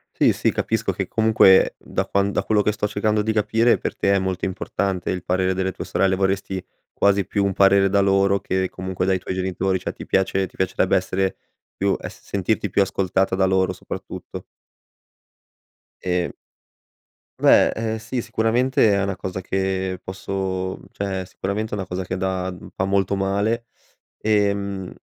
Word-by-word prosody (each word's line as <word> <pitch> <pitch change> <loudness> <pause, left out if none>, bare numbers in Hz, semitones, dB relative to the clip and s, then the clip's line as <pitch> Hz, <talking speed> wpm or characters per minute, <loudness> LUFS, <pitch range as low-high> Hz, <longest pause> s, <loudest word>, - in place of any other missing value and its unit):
Sì, - - +4
sì, - - +1
capisco - - -1
che - - -3
comunque 110 -4 +5
da - - -3
quan 100 +1 +1
da - - 0
quello 105 -1 +2
che 105 - +2
sto 105 0 -1
cercando 105 +1 0
di 110 +1 0
capire, 115 +2 +3
per - - -4
te 100 - +2
è 100 - +3
molto 95 -1 -2
importante 95 -1 -2
il 90 -1 -3
parere 95 +1 +1
delle 95 0 -1
tue - - -7
sorelle, 95 -1 +1
vorresti 95 -1 -1 0.3
quasi 100 0 +2
più 100 -1 0
un 100 - 0
parere 100 0 +5
da 100 +1 +2
loro 100 0 +3
che, 95 0 -1
comunque, 95 0 -3
dai 95 0 +2
tuoi 90 - -5
genitori, 95 0 0
cioè - - -4
ti - - -10
piace 95 0 +1
ti - - -23
piacerebbe 95 +1 +1
essere 95 0 0 0.4
più 100 0 +1
es - - -8
sentirti 100 0 -1
più 100 - +3
ascoltata 95 0 +1
da 95 0 +3
loro, 95 0 +2
soprattutto. - - -8 1.6
Ehm 90 -1 0 1.1
Beh, - - +6
ehm, 110 0 -2
sì, 115 +3 -4
sicuramente 115 +1 +2
è 100 0 +1
una 100 -1 -2
cosa 95 0 -5
che 95 0 -2
posso, 95 -1 -3
mhmm, - - -16
cioè 95 -2 -3
sicuramente 105 +4 -3
è - - +1
una 95 - -3
cosa 90 +1 -4
che 90 +1 -4
da 95 0 -1
mhmm, 90 - -11
fa 95 - 0
molto 100 0 +1
male, 100 +4 0 0.5
e, 105 -2 +2
mhmm, 100 -2 -5
95 Hz, 175 wpm, -22 LUFS, 95-100 Hz, 1.6 s, Beh